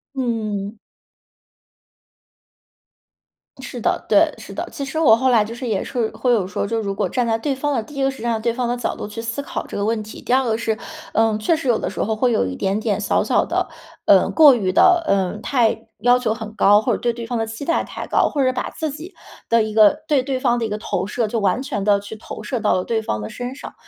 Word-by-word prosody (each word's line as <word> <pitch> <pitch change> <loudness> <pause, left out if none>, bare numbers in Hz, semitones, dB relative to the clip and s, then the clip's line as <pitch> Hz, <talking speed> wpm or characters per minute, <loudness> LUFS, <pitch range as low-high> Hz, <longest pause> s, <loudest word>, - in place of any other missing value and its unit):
嗯。 220 -5 -2 2.8
是 - - -7
的， - - 0
对， - - +4
是 - - -10
的。 - - -4
其 280 - -5
实 270 +4 -5
我 280 -9 +6
后 260 +3 +1
来 230 -4 +4
就 215 +2 -7
是 245 +1 -6
也 205 -4 -1
是 235 -3 -1
会 250 - 0
有 210 -6 +2
说， 190 - -2
就 225 +2 -1
如 200 -2 -3
果 - - -1
站 245 -2 0
在 225 -1 +1
对 275 +5 -1
方 290 +2 -2
的， 230 - -1
第 295 - -14
一 275 - -2
个 270 - +3
实 270 - -7
际 - - -9
上 230 -2 -1
对 235 +1 0
方 250 +1 -2
的 245 +1 -1
角 240 - -2
度 - - -6
去 215 +2 -6
思 230 +4 -3
考 280 - -5
这 - - -8
个 200 - -1
问 220 +1 0
题。 215 - -10
第 - - -5
二 260 +1 +4
个 220 -2 0
是， 225 -1 -1 0.4
呃， 225 -1 +2
确 215 +9 +1
实 310 -4 -5
有 240 - +3
的 - - -3
时 - - -4
候 220 +1 0
会 245 +3 +1
有 220 - +2
一 90 - -4
点 195 - -1
点 - - -1
小 - - +1
小 - - +2
的， - - -1 0.4
嗯 - - +5
过 300 -5 +7
于 195 -6 0
的 350 - +5
嗯， 195 -1 0
太 230 -4 +1
要 245 +3 +4
求 235 -3 0
很 220 -1 -8
高， 205 0 +5
或 - - 0
者 - - 0
对 240 - +1
对 230 0 -7
方 240 - -2
的 225 - 0
期 225 +5 -7
待 335 - +1
太 - - -7
高。 - - +2
或 290 - -1
者 255 0 +2
把 250 - -3
自 315 -2 -4
己 320 +7 -9 0.4
的 230 0 +4
一 215 0 -4
个 220 +7 +5
对 290 -3 +3
对 265 -1 -2
方 240 -1 +2
的 230 - -1
一 - - -3
个 210 - -2
投 190 -3 -2
射 225 +2 -1
就 225 +2 -2
完 200 +3 +1
全 255 -8 -3
地 200 0 +3
去 205 +2 -9
投 215 - -9
射 240 +3 -3
到 - - +2
了 185 - 0
对 225 -1 0
方 110 - -3
的 105 - -5
身 245 +1 -6
上， - - -9
230 Hz, 285 characters per minute, -21 LUFS, 215-255 Hz, 2.8 s, 过